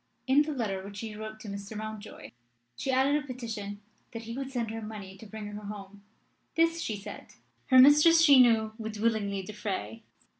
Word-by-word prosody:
In 270 +2 +5
the 300 +1 -1
letter 210 -9 -2
which 200 +1 -9
she 220 -1 -5
wrote 215 0 -7
to 215 - -9
Mr. 200 +1 -6
Mountjoy 215 0 -8 0.4
she 265 - -4
added 275 +3 +3
a - - -14
petition 220 -5 -6 0.3
that 230 0 -6
he 230 +1 -6
would 270 0 -4
send 235 -4 -2
her 225 0 -5
money 210 -3 -8
to 215 +3 -12
bring 215 0 -7
her 205 0 -7
home. 200 -1 -9 0.5
This, 330 0 +2
she 215 - -2
said, 200 - -9 0.4
her 260 - +5
mistress 300 +5 +8
she 285 -5 +8
knew 220 -3 +3
would 220 -1 -5
willingly 205 -3 0
defray. 190 - -5
220 Hz, 190 wpm, -29 LUFS, 205-255 Hz, 0.5 s, mistress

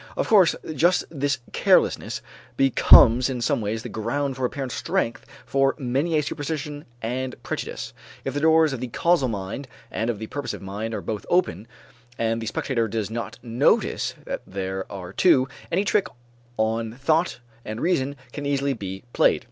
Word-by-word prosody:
Of - - 0
course 195 -6 +5 0.2
just 175 +5 +3
this 145 -2 0 0.2
carelessness - - +2 0.3
becomes 125 -1 +7
in 130 -2 -3
some 120 - +1
ways 110 +1 -2
the - - -5
ground 135 +5 -2
for 130 -1 -1
apparent 130 0 -3
strength 165 -8 -2 0.2
for 135 0 +2
many 140 +4 0
a 150 - +2
superstition 145 0 -4 0.2
and 125 +2 -2
prejudice. - - -5 0.3
If 135 - -2
the 145 - -1
doors 160 -1 +4
of 130 - -4
the 125 - -3
causal 170 +3 +2
mind 105 +5 -4 0.2
and 110 +2 -1
of 115 - -1
the 110 - -5
purposive 145 -2 -5
mind 105 +4 -4
are - - -4
both 105 -2 -5
open, 115 - +1 0.5
and 115 0 0
the 110 - -4
spectator 115 0 -1
does 110 -1 -3
not 115 -1 -4
notice 120 0 +1
that - - -4
there 95 0 -4
are 95 -2 -7
two, 135 - +4 0.2
any 195 +4 +1
trick 200 -2 +2 0.5
on 110 +1 0
thought 155 +5 +1 0.2
and 110 +1 -5
reason 140 -5 0 0.2
can 145 -1 -4
easily 140 0 +1
be 95 -4 -6
played. - - +4
130 Hz, 170 wpm, -24 LUFS, 110-145 Hz, 0.5 s, becomes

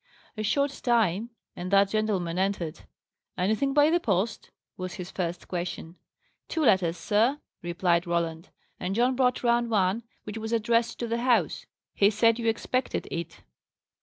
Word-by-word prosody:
A 215 - -4
short 280 +6 +1
time, 225 -3 +2 0.3
and 180 +1 -5
that 200 0 +4
gentleman 195 -6 -1
entered. 185 -4 -2 0.5
"Anything 220 +9 +1
by 295 +2 +5
the 345 - +3
post?" 210 - -1 0.3
was 185 -1 -5
his 180 0 -7
first 175 -2 -4
question. 175 -1 -4 0.5
"Two 320 - -1
letters, 180 -6 +3
sir," 230 +7 +2 0.2
replied 175 0 +1
Roland. 170 0 -2 0.3
"And 185 +2 -2
John 250 +3 +2
brought 250 -1 +1
round 235 0 +2
one, 200 0 +2 0.2
which 215 +1 -6
was 220 +1 -4
addressed 230 +1 +1
to 235 - -1
the 230 +1 -1
house. 220 - +1 0.3
He 200 - +4
said 230 +2 +3
you 230 - -2
expected 250 +3 -1
it." 170 -1 -5
210 Hz, 155 wpm, -27 LUFS, 180-235 Hz, 0.5 s, by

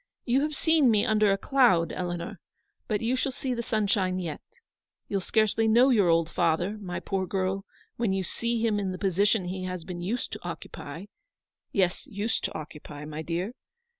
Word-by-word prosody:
You 255 +2 +3
have 300 0 -1
seen 320 -5 +4
me 210 -2 +4
under 215 -2 +4
a 195 - +2
cloud, 230 - +3
Eleanor; 175 -1 -4 0.5
but 210 -3 0
you 235 +3 +1
shall 265 +1 0
see 260 -1 -3
the 235 - -2
sunshine 200 -5 +1
yet. 170 -5 -4 0.7
You'll 200 -1 -1
scarcely 220 +2 +2
know 240 +5 +6
your 205 -7 +4
old 165 -1 +4
father, 175 +5 0
my 180 -4 -4
poor 190 -1 -2
girl, 190 +1 -1 0.3
when 230 -4 +1
you 190 0 0
see 235 +4 -1
him 210 -2 +2
in 195 -2 -1
the - - -5
position 195 +1 +2
he 185 +1 -4
has 180 -2 -4
been 175 0 -6
used 220 +8 -2
to - - -7
occupy; 165 0 -7 0.7
yes, 185 +7 +1
used 220 -1 -2
to - - -3
occupy, 150 -1 -9
my 155 +1 -5
dear. 175 +7 -2
195 Hz, 185 wpm, -28 LUFS, 175-225 Hz, 0.7 s, know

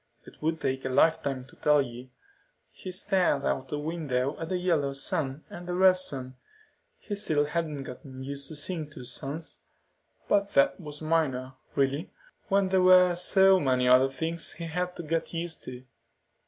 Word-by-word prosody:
"It - - -16
would 160 +1 0
take 130 -2 -2
a - - -2
lifetime 140 -2 +2
to - - -19
tell 150 0 +3
you." 125 -1 -4 0.6
He 185 - -8
stared 185 -6 +1
out 135 - -1
the 150 - -3
window 145 -3 -2
at 165 0 -5
the 185 - 0
yellow 165 -6 +1
sun 140 -1 -2
and 175 0 -9
the 175 - -2
red 185 0 +6
sun. 130 -8 -4 0.6
He 210 - -7
still 155 -8 +1
hadn't 150 -2 -3
gotten 130 0 -9
used 140 0 -5
to 155 - -7
seeing 155 0 -3
two 135 -4 -10
suns. 140 +6 -5 0.7
But 200 0 +1
that 140 0 +4
was 150 -1 -8
minor, 135 -5 0 0.2
really, 140 +5 0 0.4
when 195 -2 +2
there 190 0 +3
were 180 -1 +7
so 190 +2 +4
many 130 -4 +2
other 130 +2 +6
things 160 +4 -3
he 170 - -7
had 180 +2 -3
to 175 - -6
get 165 +2 -2
used 165 0 -4
to. 125 0 -8
155 Hz, 175 wpm, -28 LUFS, 135-175 Hz, 0.7 s, were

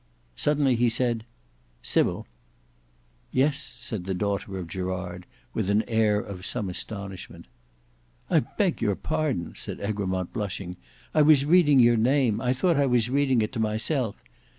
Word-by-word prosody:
Suddenly 140 - +2
he 120 0 +3
said 115 -1 0 0.6
"Sybil." - - +1 1.1
"Yes," 140 +2 +2
said 105 -9 -5
the 95 0 -2
daughter 100 0 -2
of 90 -3 -5
Gerard, 90 0 -5 0.3
with 95 - -1
an 105 +2 +3
air 110 -2 +2
of 95 -3 -7
some 105 -1 -2
astonishment. 100 0 -7 0.8
"I - - +4
beg - - -1
your 100 - +1
pardon," 155 - -2
said - - -5
Egremont 95 -3 -2
blushing; 100 -4 -4 0.4
"I 155 - +4
was 145 -2 +5
reading 150 -4 +5
your 120 -1 +5
name. 120 -2 +2
I 125 - +1
thought 165 +5 +2
I 140 -1 +3
was 125 -1 +2
reading 135 -4 +2
it 105 - -3
to 125 - -5
myself. 110 +2 0
110 Hz, 150 wpm, -26 LUFS, 100-135 Hz, 1.1 s, was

